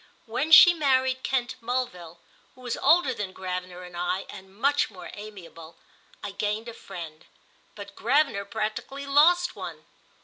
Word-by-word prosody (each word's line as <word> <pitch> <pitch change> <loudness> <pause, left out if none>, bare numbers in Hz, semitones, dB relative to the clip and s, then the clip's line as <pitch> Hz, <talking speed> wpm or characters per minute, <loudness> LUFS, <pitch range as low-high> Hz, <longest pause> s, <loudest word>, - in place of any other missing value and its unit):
When 250 +7 -2
she 345 +2 +10
married 260 -4 +1
Kent 250 -3 -2
Mulville, 225 -9 -4 0.4
who 255 - -17
was 245 -2 -3
older 320 -6 +3
than 195 -4 -6
Gravener 180 -1 -5
and 180 -1 -11
I 180 +2 -2
and 190 -1 -12
much 285 +3 +2
more 180 -2 -11
amiable, 170 -6 -11 0.5
I 205 - -4
gained 210 +3 -3
a 235 - -7
friend, 165 -6 -9 0.5
but 200 -1 -10
Gravener 265 -4 +1
practically 220 +6 -4
lost 330 +6 +4
one. - - -8
215 Hz, 145 wpm, -26 LUFS, 185-265 Hz, 0.5 s, she